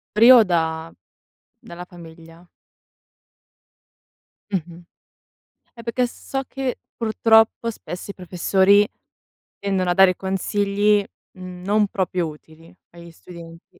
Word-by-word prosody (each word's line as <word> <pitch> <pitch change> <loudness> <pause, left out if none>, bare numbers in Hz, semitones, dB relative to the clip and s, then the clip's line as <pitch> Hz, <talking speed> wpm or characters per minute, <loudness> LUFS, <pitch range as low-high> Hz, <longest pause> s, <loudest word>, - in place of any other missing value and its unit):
Pri 230 +4 +7
o 245 -3 +8
da 160 -1 -2 0.7
dalla 175 +1 -10
famiglia? 165 0 -15 2.1
Mh-mh. 175 -1 -5 0.9
Eh 230 - -12
perché 240 +2 0
so 270 +2 -6
che 265 -2 -4 0.2
purtroppo 225 0 +2
spesso 200 -3 -8
i - - -14
professori 190 +3 +2 0.7
tendono 190 -2 -1
a 175 - +3
dare 190 -1 +5
consigli 200 +2 0 0.4
non 185 +3 -1
proprio 180 -3 -2
utili 160 +2 -14 0.2
agli 170 0 -13
studenti. 165 0 -14
185 Hz, 100 wpm, -21 LUFS, 170-210 Hz, 2.1 s, o